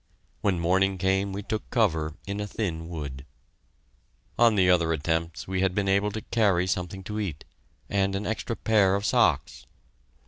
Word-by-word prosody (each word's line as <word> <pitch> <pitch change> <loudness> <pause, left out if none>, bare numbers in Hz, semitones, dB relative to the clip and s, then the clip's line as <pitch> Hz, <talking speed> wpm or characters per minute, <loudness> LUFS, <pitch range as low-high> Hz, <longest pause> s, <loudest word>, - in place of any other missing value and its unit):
When 95 -4 +1
morning 95 +3 +2
came 95 +2 +1
we 100 +1 -5
took 110 +2 -4
cover 80 - +1
in 100 +2 -4
a 105 - -3
thin 85 -6 -4
wood. 70 -6 -6 1.2
On 115 -2 +5
the 95 -2 +4
other 85 -3 +3
attempts 80 +1 -2
we 95 0 -1
had 95 -1 +1
been 100 -1 0
able 100 +2 +2
to 110 - -4
carry 100 -7 +2
something 95 +1 -3
to 105 +2 -4
eat, 90 -9 -4 0.4
and 95 -1 0
an 100 +2 -3
extra 110 +1 -3
pair 105 -4 +3
of 100 +1 -2
socks. 70 - +1
95 Hz, 170 wpm, -26 LUFS, 85-105 Hz, 1.2 s, On